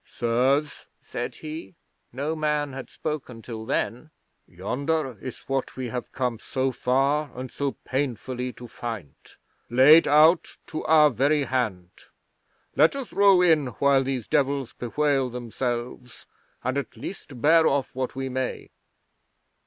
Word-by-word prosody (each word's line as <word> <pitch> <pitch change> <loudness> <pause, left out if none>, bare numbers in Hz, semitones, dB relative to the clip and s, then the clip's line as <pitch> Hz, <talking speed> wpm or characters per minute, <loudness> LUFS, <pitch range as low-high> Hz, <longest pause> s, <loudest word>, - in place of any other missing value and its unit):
"Sirs," 130 +5 0
said - - -5
he 155 - -8 0.4
(no 145 +6 -2
man 150 -2 -1
had 135 -1 -7
spoken 135 -7 -5
till 110 -2 -7
then), 125 +7 -2 0.4
"yonder 130 - -2
is 130 - -6
what 135 -1 -2
we 130 -2 -3
have 125 +1 -5
come 125 -4 -2
so 130 0 -1
far 140 +4 +1
and 130 0 -6
so 140 -1 -2
painfully 125 -1 -2
to 120 - -10
find, 110 - -6 0.6
laid 135 +7 +7
out 155 +4 +4
to 155 - -5
our 155 -2 +6
very 145 +2 +2
hand. 110 -9 -2 0.8
Let 155 - +5
us 270 -5 -6
row 195 -3 +6
in 160 -6 +4
while 140 -1 +4
these 130 -4 -3
Devils 140 -3 0
bewail 135 +1 0
themselves, 120 0 -5 0.4
and 130 +2 0
at 135 - -8
least 145 -9 -8
bear 160 +4 +5
off 140 -2 0
what 130 0 -3
we 135 0 -3
may." 130 0 -4
135 Hz, 135 wpm, -25 LUFS, 125-150 Hz, 0.8 s, laid